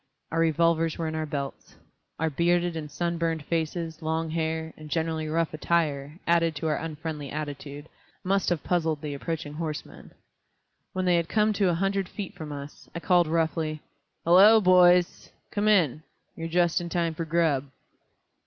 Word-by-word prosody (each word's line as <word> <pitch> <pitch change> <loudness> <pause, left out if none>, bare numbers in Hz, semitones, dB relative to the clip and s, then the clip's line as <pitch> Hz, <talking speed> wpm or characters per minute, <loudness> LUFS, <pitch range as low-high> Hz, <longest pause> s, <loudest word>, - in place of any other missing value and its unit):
Our 165 - 0
revolvers 165 0 +2
were 165 - -2
in 155 - -3
our 160 0 -2
belts. 140 -2 -5 0.4
Our 160 0 0
bearded 175 +2 +1
and 155 -2 -5
sun 170 +3 -2
burned 165 -3 -1
faces, 165 0 -2
long 160 0 -1
hair, 160 0 -2
and 155 -1 -11
generally 160 -1 -1
rough 165 +1 0
attire, 155 -2 -1
added 165 -1 +2
to 155 +2 -3
our 150 - +1
unfriendly 155 -2 -5
attitude, 145 0 -6 0.4
must 195 +1 +1
have 175 -4 -1
puzzled 160 -4 0
the 150 -2 -4
approaching 150 0 -4
horsemen. 155 -1 -6 0.8
When 185 0 -1
they 175 -1 +4
had 170 -1 -1
come 215 0 +2
to 200 -3 +2
a 170 - +1
hundred 195 +1 0
feet 200 -3 -6
from 155 -2 -8
us, 140 0 -9
I - - -2
called 175 -1 +3
roughly, 160 -1 -1 0.4
"Helloa, 200 +6 +7
boys! 180 -1 +4 0.2
come 205 +1 0
in. 170 - +3 0.3
You're 165 - -5
just 175 0 +2
in 170 - -5
time 170 -2 0
for 165 - -4
grub." 155 -4 +1
165 Hz, 170 wpm, -27 LUFS, 155-175 Hz, 0.8 s, Helloa